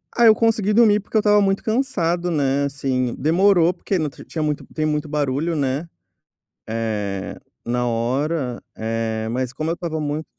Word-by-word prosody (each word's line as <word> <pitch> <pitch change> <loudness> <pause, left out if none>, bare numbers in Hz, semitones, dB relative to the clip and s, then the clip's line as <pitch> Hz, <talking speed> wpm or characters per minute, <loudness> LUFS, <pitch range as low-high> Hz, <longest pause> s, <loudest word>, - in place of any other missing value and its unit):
Ah, 235 - +4
eu 220 - +8
consegui 215 -3 +2
dormir, 215 -2 +5
porque 210 - -3
eu - - +6
estava 210 0 +4
muito 195 0 +1
cansado, 180 -8 0
né, 140 -3 +1
assim, 130 -3 -1
demorou 175 +3 +3
porque 190 +2 -2
tri 135 - -13
tinha 160 - -3
muito 150 -1 -1
tem 155 - -1
muito 150 0 -1
barulho, 150 +2 -1
né, 140 +2 -1 0.8
eh, 105 -4 -3 0.3
na 125 +1 0
hora, 125 +3 -1 0.2
eh, 110 0 -2
mas 125 0 -2
como 155 +5 -3
eu - - +1
estava 170 -2 -4
muito 150 +1 -3
150 Hz, 170 wpm, -21 LUFS, 125-180 Hz, 0.8 s, eu